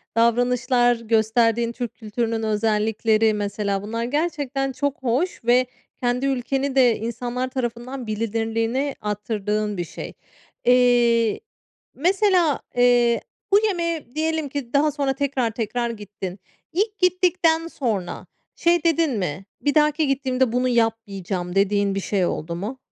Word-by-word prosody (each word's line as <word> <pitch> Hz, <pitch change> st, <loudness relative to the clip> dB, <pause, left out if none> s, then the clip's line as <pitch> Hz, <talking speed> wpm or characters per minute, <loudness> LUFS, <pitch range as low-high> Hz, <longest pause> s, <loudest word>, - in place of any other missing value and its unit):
davranışlar, 245 Hz, +1 st, +3 dB
gösterdiğin 230 Hz, +1 st, +1 dB
Türk 235 Hz, -1 st, -5 dB
kültürünün 225 Hz, 0 st, -2 dB
özellikleri, 220 Hz, +1 st, +2 dB
mesela 200 Hz, -1 st, -2 dB
bunlar 230 Hz, +3 st, -3 dB
gerçekten 280 Hz, -1 st, -1 dB
çok 275 Hz, 0 st, -3 dB
hoş 260 Hz, +7 st, -1 dB
ve 245 Hz, +2 st, +4 dB, 0.3 s
kendi 245 Hz, +1 st, 0 dB
ülkeni 270 Hz, +1 st, -1 dB
de 250 Hz, -4 st, +5 dB
insanlar 240 Hz, +3 st, -3 dB
tarafından 250 Hz, 0 st, -4 dB
bilinirliğini 225 Hz, +5 st, -1 dB
arttırdığın 210 Hz, 0 st, -2 dB
bir 175 Hz, -, -1 dB
şey. -, -, -8 dB, 0.5 s
Eee, 240 Hz, -2 st, +4 dB, 0.6 s
mesela, 360 Hz, -1 st, +2 dB, 0.2 s
eee, 245 Hz, -1 st, +4 dB, 0.3 s
bu 405 Hz, -, +8 dB
yemeğe 335 Hz, -, -3 dB
diyelim 315 Hz, -1 st, -1 dB
ki 270 Hz, -3 st, -5 dB
daha 300 Hz, +2 st, +3 dB
sonra 280 Hz, -2 st, -1 dB
tekrar, 270 Hz, -4 st, -1 dB
tekrar 235 Hz, +2 st, -2 dB
gittin. 205 Hz, -4 st, -7 dB, 0.3 s
İlk 420 Hz, +4 st, -1 dB
gittikten 360 Hz, -3 st, +2 dB
sonra 220 Hz, -, -3 dB, 0.3 s
şey 340 Hz, -1 st, +2 dB
dedin 330 Hz, -2 st, +2 dB
mi, 180 Hz, -1 st, -3 dB, 0.2 s
"Bir 290 Hz, +1 st, 0 dB
dahaki 300 Hz, 0 st, +3 dB
gittiğimde 260 Hz, -2 st, +1 dB
bunu 250 Hz, +1 st, +1 dB
yapmayacağım." 200 Hz, -6 st, -1 dB
dediğin 200 Hz, 0 st, +2 dB
bir -, -, 0 dB
şey 195 Hz, -1 st, 0 dB
oldu 170 Hz, 0 st, -3 dB
mu? 210 Hz, +9 st, -5 dB
240 Hz, 125 wpm, -23 LUFS, 220-275 Hz, 0.6 s, bu